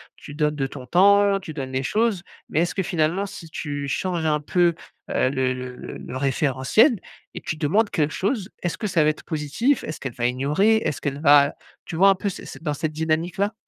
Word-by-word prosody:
tu 145 - -11
donnes 150 0 0
de 140 -2 -1
ton 130 -1 -8
temps, 200 +5 +5
tu 165 -4 -8
donnes 135 -3 -5
les 130 +1 -1
choses. 215 - 0 0.3
Mais 160 - +1
est-ce 175 - 0
que 195 - -1
finalement, 180 +1 0
si 190 -4 -10
tu 145 -2 -4
changes 175 +3 -2
un 150 -1 +2
peu, 170 +3 +2 0.4
heu, 130 - +2
le 130 -1 0
le 125 0 -7
le - - -8
le 130 - -7
référentiel 140 - +2 0.4
et - - -6
tu - - -3
demandes 200 +8 +2
quelque 155 -3 0
chose, 200 0 -1
est-ce 175 - -2
que 215 - -2
ça 175 -5 +2
va 150 - +4
être 155 - -12
positif? 160 - 0
Est-ce 155 - -6
qu'elle 135 -2 -5
va 120 -1 -2
ignorer? 150 - +2
Est-ce 150 - -2
qu'elle 140 0 -3
va, 145 -2 +6
heu, - - -9 0.3
tu - - -6
vois 195 +3 +7
un 195 - +5
peu 200 +2 -2
c'est 190 - -8
c'est, - - -10
dans 150 -3 -1
cette 155 +1 -3
dynamique-là? 165 +6 -1
155 Hz, 230 wpm, -23 LUFS, 140-195 Hz, 0.4 s, vois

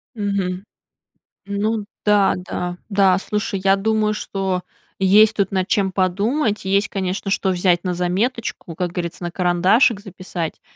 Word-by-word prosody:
Мгм. 195 -3 -2 0.8
Ну 205 +1 -1 0.2
да, 205 -2 +4
да. 180 0 -4
Да, 195 -3 +4
слушай, 205 0 -2
я 195 0 +5
думаю, 215 +1 +1
что 190 -3 -2 0.4
есть 210 +3 +5
тут 200 -2 0
над 190 -1 0
чем 200 -3 +1
подумать, 205 +6 0
есть, 195 +2 +2
конечно, 195 0 -3
что 195 -1 +1
взять 180 -1 +2
на 180 -2 -1
заметочку, 180 +1 -2
как 175 +1 -2
говорится, 175 0 -5
на 175 - -3
карандашик 185 +6 +3
записать. 185 -4 -6
195 Hz, 140 wpm, -20 LUFS, 180-210 Hz, 0.8 s, я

